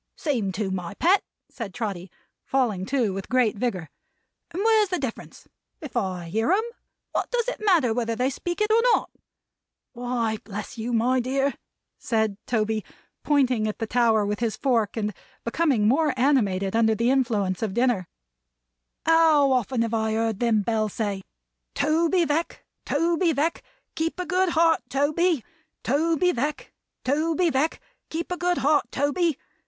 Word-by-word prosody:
"Seem 255 - -1
to, 200 -1 -2
my 180 0 -4
Pet," 375 - +3 0.3
said 215 -6 -7
Trotty, 195 -6 -4 0.3
falling 220 -9 0
to 245 -7 +1
with 195 0 -6
great 250 -4 +2
vigor. 200 -7 -2 0.6
"And 375 +4 -3
where's 440 -3 +4
the 365 - 0
difference? 265 -7 -6 0.3
If 295 -8 -9
I 185 -3 -2
hear 225 - +1
'em, 410 +4 +3 0.5
what - - -2
does 485 -1 0
it - - -3
matter 330 - +3
whether 230 -1 -1
they 255 +3 0
speak 345 +8 -4
it 425 0 +2
or 455 +1 +5
not? - - -4 0.8
Why 240 -3 -2
bless 205 0 -7
you, 230 +1 -4
my 245 +3 +2
dear," 270 +3 0 0.5
said 220 -4 0
Toby, 220 -2 0 0.4
pointing 255 -7 +2
at 215 - -3
the 225 - -2
tower 225 -2 +2
with 205 0 -2
his 230 -2 -1
fork, 230 -6 0
and 210 -1 -1 0.3
becoming 240 -4 +1
more 285 +3 +2
animated 205 -8 +2
under 220 -1 +3
the 235 +4 +2
influence 215 -8 0
of 210 -3 -2
dinner, 240 -7 +1 1.0
"how 320 -4 +5
often 250 -1 +1
have 230 0 -3
I 220 -1 0
heard 225 -2 -1
them 225 -3 +2
bells 215 -1 -1
say, 205 -3 -2 0.5
'Toby 330 +4 +2
Veck, 315 +3 -2 0.2
Toby 335 +3 +2
Veck, 310 +4 0 0.3
keep 330 +2 -2
a 360 - -2
good 370 +2 +1
heart 330 0 +4
Toby! 295 +2 +1 0.4
Toby 325 +6 +2
Veck, 290 +3 -3 0.3
Toby 320 +5 +1
Veck, 290 +4 0 0.3
keep 335 +2 -4
a 360 - -1
good 355 0 0
heart 295 +1 +2
Toby!' 290 +2 0
250 Hz, 160 wpm, -25 LUFS, 220-320 Hz, 1.0 s, or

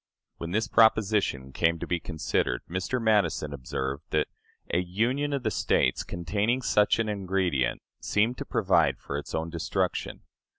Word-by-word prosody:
When 85 - -5
this 110 +4 0
proposition 105 -12 +3
came 85 +4 +1
to - - -5
be 85 - -1
considered, 80 -7 -1
Mr. 90 +9 -2
Madison 100 -10 +1
observed 65 +1 -4
that - - +1 0.4
"a 85 - +4
union 120 +11 0
of 140 -3 -2
the - - 0
States - - +1
containing 105 +9 -1
such 105 -3 +3
an 115 -1 0
ingredient 95 -10 0 0.2
seemed 115 +4 +1
to - - -4
provide 85 - +2
for 70 - -6
its - - -6
own 80 +1 -2
destruction. 85 -1 -2
90 Hz, 155 wpm, -27 LUFS, 80-110 Hz, 0.4 s, a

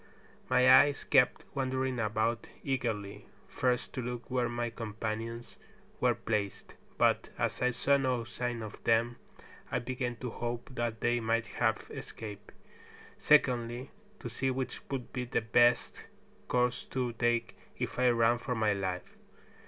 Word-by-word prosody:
My 125 - +5
eyes 135 +3 +7
kept 135 -3 +3
wandering 130 -2 -1
about 110 +1 0 0.2
eagerly, 115 -7 -2 0.2
first 125 -1 0
to 130 - -3
look 125 +2 -5
where 125 -2 +1
my 120 0 -2
companions 115 +1 -5 0.4
were - - +3
placed, 105 -3 -3 0.2
but - - +3
as - - -1
I 125 - +4
saw 140 +3 +2
no 130 -3 0
sign 120 0 -3
of 110 - -9
them 115 +1 +2 0.5
I - - +1
began 125 0 -3
to 125 0 -5
hope 120 +2 -4
that 120 -2 -2
they 120 0 +2
might 115 0 +1
have - - -1
escaped; 105 -2 -8 0.7
secondly, 125 -3 +3 0.3
to - - -5
see 130 +3 -1
which 130 -1 -3
would 130 -3 -4
be 125 -1 -2
the 120 - 0
best 120 +2 +3 0.4
course 125 0 +1
to 125 -2 -2
take 120 0 0 0.2
if - - -3
I 125 0 +5
ran 120 0 +3
for 125 - -3
my 110 -2 +2
life. 95 -2 -4
120 Hz, 145 wpm, -31 LUFS, 115-125 Hz, 0.7 s, eyes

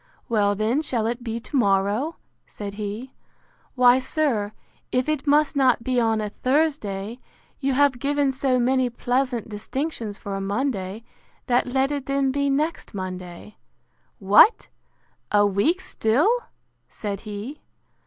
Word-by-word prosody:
—Well, 205 -3 +2
then, 220 +8 +1
shall 240 -7 -1
it 240 +2 -2
be 230 -1 -3
to 260 - -8
morrow? 205 +6 +2 0.3
said 200 -1 -7
he.—Why, 245 +3 -1
sir, 255 -7 0 0.4
if 255 +2 +1
it 305 -1 -1
must 295 +1 +3
not 255 -4 +3
be 255 0 +1
on 225 -2 +1
a 210 -1 -4
Thursday, 250 -6 -1 0.4
you 275 -1 0
have 275 -2 +3
given 285 0 +1
so 265 -1 +1
many 255 +1 +2
pleasant 245 0 -1
distinctions 220 0 -4
for 200 - -6
a 195 - -3
Monday, 200 -1 -2 0.4
that 245 0 +2
let 265 +2 +1
it 285 -2 -3
then 275 -1 +1
be 280 +1 0
next 300 -3 -1
Monday.—What! 185 - 0 0.6
a 205 0 +5
week 205 - +1
still? 290 - +2 0.6
said 200 -2 -5
he. 215 +8 -7
245 Hz, 135 wpm, -24 LUFS, 205-275 Hz, 0.6 s, a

